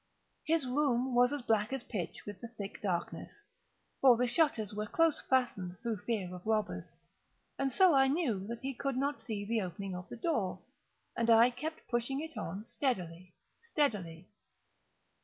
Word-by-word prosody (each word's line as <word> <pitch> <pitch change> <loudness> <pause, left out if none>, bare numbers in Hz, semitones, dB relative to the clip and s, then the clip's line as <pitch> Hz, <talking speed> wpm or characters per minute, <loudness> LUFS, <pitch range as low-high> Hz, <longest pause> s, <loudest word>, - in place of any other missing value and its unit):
His 320 -3 +2
room 255 -1 +1
was 245 +1 +5
as 290 -3 -3
black 220 -1 +1
as 270 -2 -3
pitch 180 -7 -5
with 205 -2 -8
the 235 - -5
thick 210 -4 -8
darkness, 190 - -3 0.6
(for 255 -3 +7
the 250 - +2
shutters 240 -6 +1
were 210 +1 -3
close 330 +5 +2
fastened, 200 -9 0
through 230 -3 -1
fear 205 -3 -2
of 180 0 -8
robbers,) 215 -1 -1 0.6
and 275 -1 +1
so 375 +1 +6
I 270 -1 +5
knew 260 - 0
that 235 0 -5
he 270 +1 -3
could 270 +1 -2
not 280 +2 -1
see 210 -4 -4
the 225 +1 0
opening 185 +1 -5
of 180 0 -8
the - - -7
door, 225 - -1 0.5
and 235 0 0
I 230 +2 +7
kept 310 +6 -6
pushing 240 +3 -1
it 320 +1 -6
on 195 +6 -5
steadily, 185 - -2 0.3
steadily. 205 - -1
235 Hz, 170 wpm, -33 LUFS, 200-270 Hz, 0.6 s, for